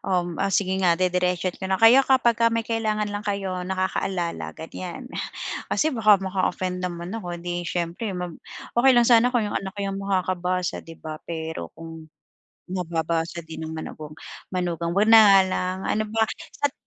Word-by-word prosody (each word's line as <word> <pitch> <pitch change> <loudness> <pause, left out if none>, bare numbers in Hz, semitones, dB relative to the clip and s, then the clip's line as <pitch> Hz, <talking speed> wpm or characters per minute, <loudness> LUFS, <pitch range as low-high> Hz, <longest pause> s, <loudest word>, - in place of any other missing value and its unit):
um, 175 -3 -1
o 195 - +2
sige 190 -1 +1
nga 175 -3 +4
didiretsohin 180 0 0
ko - - -5
na, 190 - +2
"Kayo, 225 +6 +7
kapagka 235 -3 +4
may 230 0 -1
kailangan 215 -2 -1
lang 205 - -3
kayo 195 -3 -2
nakakaalala." 185 -2 -2
Ganiyan. 180 +9 -7 0.6
Kasi 315 0 +1
baka 215 -4 +5
maka-offend 185 -1 -1
naman 175 0 -4
ako, 180 -6 -5
eh, - - -11
di 175 - -2
siyempre 175 +5 -2
mag 180 -1 -4 0.4
okey 260 +2 +6
lang 240 - +6
sana 235 0 +6
kung 245 -3 +1
yung 205 - -2
anak 195 +1 -8
yung 195 0 -3
makakabasa 185 -2 -1
'di 165 0 -12
ba, 155 -1 -8
pero 160 - -4
kung 160 -1 -10 0.6
mababasa 170 -2 -2
din 160 0 -8
ng 160 - -6
manugang 155 -1 -7 0.4
manugang 170 -2 -1
ko 200 - +3
'wag 220 - +3
na 225 - +10
nga 195 -1 +8
lang, 185 0 -1 0.2
ano 215 - +2
ba? 220 +1 0 0.3
Sat 285 -1 0
185 Hz, 175 wpm, -24 LUFS, 170-210 Hz, 0.6 s, na